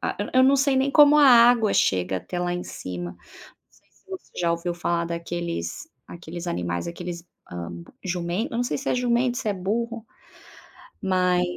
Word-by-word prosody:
ah, - - -3 0.2
eu 255 0 +5
não 270 +1 +5
sei 275 0 +2
nem 270 +1 +1
como 295 0 +7
a 295 - +7
água 235 -3 +6
chega 95 0 +1
até 180 - -6
lá 175 0 -1
em 175 - -4
cima. 90 -1 -7 0.9
Você 375 - -8
já 170 - +1
ouviu 170 +1 -3
falar 170 0 -1
daqueles, 170 - -4 0.2
aqueles 170 +1 -8
animais, 85 - -3
aqueles, 170 0 -7 0.3
hã, 85 -1 -6 0.3
jumento, 175 +3 -2
eu - - -1
não 245 - +1
sei - - -2
se 275 - -5
é - - +1
jumento, 245 0 +1
se 220 - -3
é 205 - 0
burro, 225 +4 -3 1.0
mas 180 -2 +2
180 Hz, 170 wpm, -24 LUFS, 170-240 Hz, 1.0 s, como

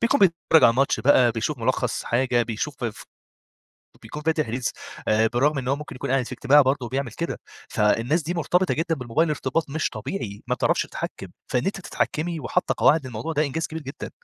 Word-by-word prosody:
بيكون 240 +4 +2
بيتفرّج 170 -3 +4
على 115 - +7
ماتش 135 +4 +1
بقى 125 -3 +5
بيشوف 125 +5 -2
ملخَّص 115 - -1
حاجة، 120 0 +2
بيشوف 120 +4 -4
ف 115 -3 -4 0.9
وبيكون 150 +7 -9
فاتح 155 -3 +1
ريلز 125 +2 -2 0.4
آآ، 110 +1 +4
بالرغم 140 +6 +1
إن 125 -2 -3
هو 135 - +2
ممكن 150 -1 -8
يكون - - -4
قاعد 135 -1 +2
في - - -8
اجتماع 140 +3 +5
برضه 130 -1 0
وبيعمل 130 -2 -3
كده، 170 +5 -4 0.3
فالناس 115 +10 +1
دي 165 +4 -3
مرتبطة 175 +3 +1
جدًا 165 +1 0
بالموبايل 140 +4 0
ارتباط 150 +1 -1
مش 155 +2 -1
طبيعي، 105 - -5
ما 125 - +1
بتعرفش 125 - +1
تتحكم، - - -6 0.2
فإن 125 - 0
أنتِ 195 0 -2
تتحكمي 170 -2 -2
وحاطّة - - 0
قواعد 150 -3 +4
للموضوع 120 +6 -4
ده 150 0 +1
إنجاز 155 +3 -2
كبير 160 0 -7
جدًا. 135 0 -7
140 Hz, 195 wpm, -24 LUFS, 120-160 Hz, 0.9 s, على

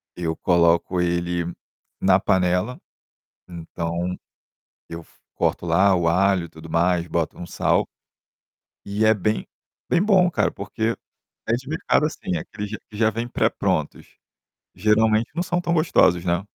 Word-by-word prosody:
Eu 80 -2 -2
coloco 85 +2 +2
ele 85 0 -1 0.5
na 95 0 +4
panela, 90 +5 +1 0.7
então, 85 +1 -4 0.7
eu 85 0 -7
f - - -22 0.2
corto - - -1
lá 95 +4 +4
o 85 -2 0
alho 95 +1 +2
e - - -12
tudo 80 +1 -12
mais, 85 +1 +1
boto 85 -2 -2
um 90 - -6
sal. - - +1 1.0
E 105 +2 0
é 110 - +6
bem 105 +1 -1 0.5
bem 175 - +3
bom 190 -3 +4
cara, - - 0
porque 110 +3 -2 0.5
é - - +2
de 130 +2 -9
mercado, 155 -1 +1
assim, 90 - -4
é - - -1
aqueles 105 +3 -7
q 105 - -5
que 105 - -10
já 110 0 +3
vêm 115 +2 -4
pré-prontos. - - -1 0.6
Geralmente 110 +1 +2
não 175 - 0
são 175 0 -1
tão 170 - -1
gostosos, 95 - +3
né. 85 0 +1
95 Hz, 150 wpm, -23 LUFS, 85-110 Hz, 1.0 s, é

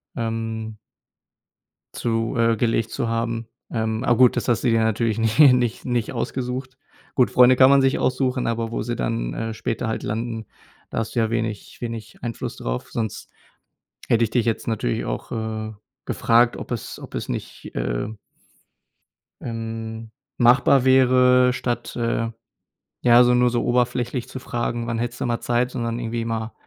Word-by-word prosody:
ähm 110 -1 -3 1.2
zu 115 -1 -1
äh, 115 -1 +3
gelegt 115 -1 0
zu 130 -4 -2
haben. 115 0 -2 0.2
Ähm, 110 0 -1
a 120 - +3
gut, 125 0 +5
das - - -1
hast 120 -3 +1
du 125 - +3
dir 115 -1 +3
natürlich 110 0 0
nicht 110 +2 0
nicht 125 -5 +5
nicht 120 -3 -1
ausgesucht. 130 0 -4 0.4
Gut, 125 - +3
Freunde 125 0 +6
kann 130 +1 +7
man 140 0 +6
sich 135 0 +2
aussuchen, 130 -1 0
aber 115 0 -1
wo - - -2
sie 120 +1 -3
dann, - - -2
äh, 115 0 -3
später 115 +1 -3
halt 110 - -3
landen, 115 +1 -3 0.5
da - - -1
hast 115 0 -4
du - - +2
ja 110 -1 +2
wenig 115 -3 -3
wenig 115 -2 -6
Einfluss 115 -2 -5
drauf, - - -4
sonst 110 -3 -4 0.8
hätte 115 0 +4
ich 110 - -7
dich 120 -3 +1
jetzt 115 -2 -1
natürlich 110 - -1
auch, - - -5
äh, 110 -1 -4 0.3
gefragt, 120 0 +3
ob - - -8
es 120 - -5
ob - - -10
es - - -4
nicht, - - -6
äh - - -2 1.3
ähm, 115 -1 -6 0.3
machbar 125 +2 +5
wäre, 125 -1 +5
statt, 120 -2 -3
äh, 115 -1 -1 0.7
ja, 120 0 +7
so 125 0 +4
nur 125 0 +4
so 120 0 0
oberflächlich 120 0 0
zu 130 - -7
fragen: 120 -1 -3
„Wann 115 -1 -2
hättest 120 +1 -4
du - - 0
mal 120 -1 -1
Zeit?“, 120 +1 0
sondern 115 -1 -3
irgendwie 115 -1 -3
mal 115 0 -3
115 Hz, 170 wpm, -23 LUFS, 115-125 Hz, 1.3 s, kann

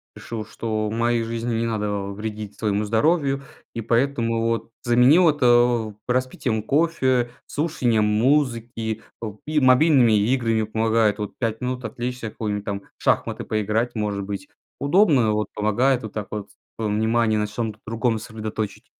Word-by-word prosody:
решил, 110 -3 -6
что 110 -1 -3
в - - -4
моей 115 0 +1
жизни 115 +1 -3
не 115 +1 0
надо 110 -2 -1 0.2
вредить 105 0 -6
своему 105 -1 0
здоровью, 135 +4 +1 0.3
и 115 - -4
поэтому 115 -1 +1
вот 115 0 -1
заменил 125 +9 +5
вот, 150 -3 +3
э, 120 -3 +4
распитием 125 -3 -1
кофе, 130 -4 +1 0.2
слушанием 125 -8 +1
музыки, 115 -1 0 0.2
о 105 -2 -6
и 155 0 +1
мобильными 130 -2 +5
играми. 115 0 +1
Помогает 110 0 +1
вот 105 - -4
5 115 -2 -2
минут 125 0 -3
отвлечься, 125 0 -4
в 110 - -7
какую-нибудь 105 -2 -3
там, 100 -1 -3 0.2
в - - -17
шахматы - - +1
поиграть, 110 +3 -1
может 105 -3 -2
быть, 95 -1 -6 0.3
удобно, 140 - +4
вот 105 0 -1
помогает 120 +5 +1
вот 110 - -7
так 105 -2 -4
вот, 105 -1 -5 0.3
э, 115 - -2
внимание 110 +1 +1
на 105 0 0
чём-то 110 0 -4
другом 115 +1 0
сосредоточить. 110 -2 -5
115 Hz, 155 wpm, -23 LUFS, 110-125 Hz, 0.3 s, заменил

